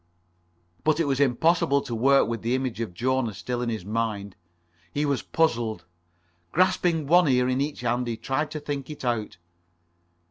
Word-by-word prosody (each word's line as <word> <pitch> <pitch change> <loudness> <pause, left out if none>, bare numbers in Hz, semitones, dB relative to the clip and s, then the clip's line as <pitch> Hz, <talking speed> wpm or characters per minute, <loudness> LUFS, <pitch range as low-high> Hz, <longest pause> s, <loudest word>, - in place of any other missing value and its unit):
But 155 0 +2
it 165 - +2
was 135 -2 0
impossible 140 +2 +3
to 120 - -6
work 135 +4 +4
with 115 0 -3
the 120 +3 0
image 130 -3 -2
of 115 - -3
Jona 125 0 0
still 120 +4 -3
in 120 - -1
his 110 -6 -4
mind. 105 -2 -2 0.6
He 145 +1 0
was 140 -2 0
puzzled. 120 - 0 0.7
Grasping 175 -3 +2
one 175 +3 +5
ear 125 -2 +3
in 130 +1 +1
each 145 -1 -3
hand 120 +1 0
he 115 -1 -3
tried 150 +5 -2
to 155 - -5
think 145 -2 -5
it 150 -3 -7
out. 115 -6 -2
130 Hz, 175 wpm, -26 LUFS, 115-150 Hz, 0.7 s, one